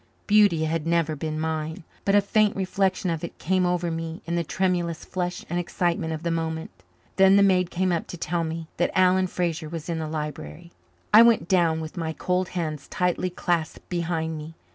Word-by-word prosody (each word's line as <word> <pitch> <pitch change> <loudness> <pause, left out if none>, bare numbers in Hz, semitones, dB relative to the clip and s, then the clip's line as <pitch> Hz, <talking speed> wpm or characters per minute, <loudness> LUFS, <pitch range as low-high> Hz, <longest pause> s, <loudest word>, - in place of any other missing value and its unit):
Beauty 205 -7 +4
had 160 0 -2
never 165 -2 +1
been 155 +1 -4
mine, 160 +2 -3 0.2
but 200 - +3
a 205 - +6
faint 210 +1 +2
reflection 190 -1 0
of 165 -1 -3
it 170 - -6
came 185 +1 +1
over 175 -1 0
me 165 0 -5
in 170 - -3
the 170 0 +1
tremulous 175 -1 -1
flush 180 -1 -3
and 175 - -1
excitement 170 -2 -1
of 160 0 -4
the 170 - 0
moment. 160 - -3 0.5
Then 190 0 +6
the 200 - +6
maid 180 -2 +3
came 185 +1 0
up 170 - -1
to 175 - -7
tell 170 +1 -1
me 165 0 -4
that 175 - +2
Alan 185 0 +4
Fraser 170 -3 -2
was 165 0 -6
in 165 -1 -1
the 155 -1 -3
library. 150 - -6 0.4
I 215 - +10
went 230 -8 +5
down 170 -4 +2
with 160 +3 -8
my 160 -1 -2
cold 180 +2 -1
hands 155 -4 -3
tightly 180 0 0
clasped 170 -2 -2
behind 165 -2 -2
me. 155 +2 -9
170 Hz, 200 wpm, -25 LUFS, 160-185 Hz, 0.5 s, I